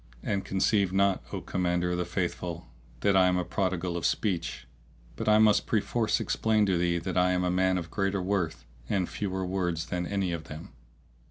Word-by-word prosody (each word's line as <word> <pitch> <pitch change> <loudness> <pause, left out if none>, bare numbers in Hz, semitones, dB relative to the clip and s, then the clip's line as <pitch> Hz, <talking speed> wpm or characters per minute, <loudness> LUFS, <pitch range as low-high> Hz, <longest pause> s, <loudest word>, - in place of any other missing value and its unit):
And 100 -1 -1
conceive 95 0 +1
not, 100 0 +2
O - - -4
Commander 90 -1 0
of 90 - -1
the 90 - 0
Faithful, 85 -1 -3 0.4
that 100 - +3
I 95 -1 +6
am 90 -1 +1
prodigal 90 -3 -1
of 85 - -3
speech; 85 - -1 0.5
but 85 - -1
I 105 - +6
must 110 -1 +4
perforce 110 0 +1
explain 110 -1 +1
to 95 -2 +1
thee 85 0 +1
that 85 +2 -1
I 90 0 +3
am 90 0 +1
a 90 - +1
man 95 0 +2
of 85 -2 -5
greater 100 -1 0
worth 90 -6 -2 0.2
and 95 -3 +1
fewer 95 -2 -3
words 90 -3 -1
than 90 0 -2
any 100 -3 -1
of 85 -2 -4
them. 80 +3 -9
90 Hz, 190 wpm, -28 LUFS, 85-100 Hz, 0.5 s, I